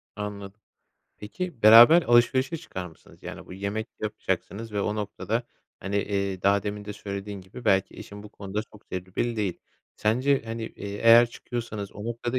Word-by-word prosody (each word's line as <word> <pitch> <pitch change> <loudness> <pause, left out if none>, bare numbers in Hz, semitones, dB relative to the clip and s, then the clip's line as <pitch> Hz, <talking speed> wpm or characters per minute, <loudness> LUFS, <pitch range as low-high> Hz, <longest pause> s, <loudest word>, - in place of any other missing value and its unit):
Anladım. 105 0 -7 0.6
Peki, 130 - -6
beraber 120 +10 +9
alışverişe 130 +5 +3
çıkar 95 - -7
mısınız? 80 - -17
Yani, - - -8
bu - - -11
yemek 100 +4 -3
yapacaksınız 110 +1 -3
ve 105 - -1
o 105 +1 -1
noktada, 110 +2 -2 0.4
hani, 100 +2 -3
eee, 100 -2 -1
daha 100 0 +3
demin 105 +1 -5
de 105 - -6
söylediğin 100 0 -6
gibi 95 +6 -12
belki 95 -2 +2
eşin 100 0 -10
bu 105 - -11
konuda 100 0 -5
çok 105 -1 -19
tecrübeli 95 +6 -3
değil. 100 -5 -2 0.4
Sence, 130 +6 +2
hani, 115 0 -5
eee, 100 -2 -7
eğer 115 +1 +8
çıkıyorsanız 115 -5 -6
o 105 - -8
noktada 120 +2 -2
105 Hz, 165 wpm, -26 LUFS, 100-115 Hz, 0.6 s, beraber